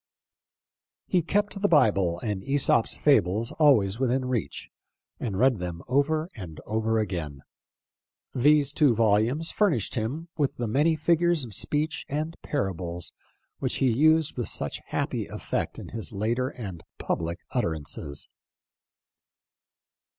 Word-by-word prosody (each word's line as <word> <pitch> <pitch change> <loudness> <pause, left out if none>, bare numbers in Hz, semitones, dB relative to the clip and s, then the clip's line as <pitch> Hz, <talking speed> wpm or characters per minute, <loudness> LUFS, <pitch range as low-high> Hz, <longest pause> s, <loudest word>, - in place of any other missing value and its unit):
He 180 - +2
kept 200 +3 -1
the 205 - +4
Bible 100 - +3
and 105 -4 -3
"yEsop's 135 -3 +2
Fables 115 -4 +2
" - - -33
always 115 -9 +4
within 130 0 +1
reach, 125 -3 -3 0.5
and 105 -6 -3
read 125 -1 +3
them 85 -1 -5
over 155 +5 +1
and 85 -7 -8
over 110 +1 0
again. 85 -10 -3 0.9
These 145 +2 +4
two 145 -7 +4
volumes 115 +8 +2
furnished 165 - +1
him 135 +10 -3
with 145 -3 0
the 120 - -2
many 150 +9 +2
figures 170 0 +2
of 115 -4 -8
speech 150 - -1
and 155 +3 -2
parables 90 - -3 0.5
which - - -1
he 130 -2 +2
used 155 +5 +3
with 120 - -2
such - - -4
happy - - -2
effect - - -3
in - - -8
his 115 0 -4
later 115 +5 -1
and 95 -11 -7 0.2
public 85 +1 -2
utterances. 75 - -3
120 Hz, 130 wpm, -27 LUFS, 100-150 Hz, 0.9 s, the